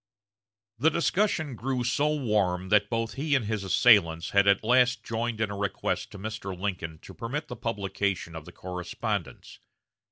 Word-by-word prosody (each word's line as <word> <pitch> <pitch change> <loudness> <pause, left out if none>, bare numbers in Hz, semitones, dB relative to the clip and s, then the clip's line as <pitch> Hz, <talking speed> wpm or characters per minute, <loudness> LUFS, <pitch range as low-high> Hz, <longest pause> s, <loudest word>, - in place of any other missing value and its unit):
The 155 +6 +5
discussion 170 - 0
grew 125 +2 -2
so 130 +5 +1
warm 100 -9 0
that 105 0 +4
both 115 -1 -1
he 145 +1 0
and 130 -5 +1
his 105 -1 -2
assailants 95 -5 +4
at 100 0 +4
last 125 0 +3
joined 115 0 -2
in 110 -2 0
a - - -4
request 100 +1 -2
to - - -8
Mr. 100 -3 -5
Lincoln 90 -5 -3
to - - -11
permit 140 +6 -4
the 125 - -5
publication 100 -6 -2
of 80 -2 -7
the - - -11
correspondence. 90 -1 -5
110 Hz, 160 wpm, -28 LUFS, 95-125 Hz, -, The